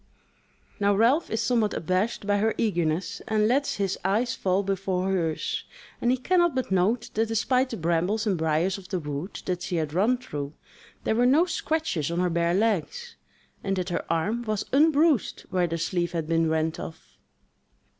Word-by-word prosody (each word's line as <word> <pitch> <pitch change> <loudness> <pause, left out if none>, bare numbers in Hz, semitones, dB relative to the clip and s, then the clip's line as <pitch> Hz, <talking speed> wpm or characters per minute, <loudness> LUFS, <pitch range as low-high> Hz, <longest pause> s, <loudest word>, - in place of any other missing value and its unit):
Now 200 0 +3
Ralph 245 +10 +3
is 225 - -1
somewhat 220 -2 +1
abashed 185 +6 -1
by 205 0 +2
her 220 +2 +1
eagerness, 175 -1 -1
and 215 -1 +2
lets 275 +5 +1
his 195 -2 -1
eyes 215 +6 +1
fall 190 +1 0
before 195 -1 -1
hers; 165 -5 -1 0.4
and 240 - +2
he 255 - +3
cannot 345 +3 +2
but 260 -6 -2
note 205 +6 +1
that 225 +1 +1
despite 250 +4 +1
the 230 - -5
brambles 175 +6 0
and 205 -3 +1
briars 160 +4 0
of 185 - -14
the 185 - -1
wood 150 +3 -5
that 180 -1 -2
she 180 - -3
had 155 -3 -1
run 215 +8 +3
through, 145 - -6 0.5
there - - +1
were 240 +2 +3
no 300 +7 +5
scratches 315 - -1
on 170 +1 -1
her 180 -1 +1
bare 170 +1 +1
legs, 225 - -1 0.5
and 195 0 0
that 185 0 -2
her 175 - -2
arm 205 +9 0
was 215 -3 -2
unbruised 300 - +3
where 180 -2 +2
the 165 0 -2
sleeve 175 +1 -1
had 165 -2 -2
been 165 0 +2
rent 160 0 0
off. 160 0 -10
195 Hz, 185 wpm, -26 LUFS, 170-235 Hz, 0.5 s, no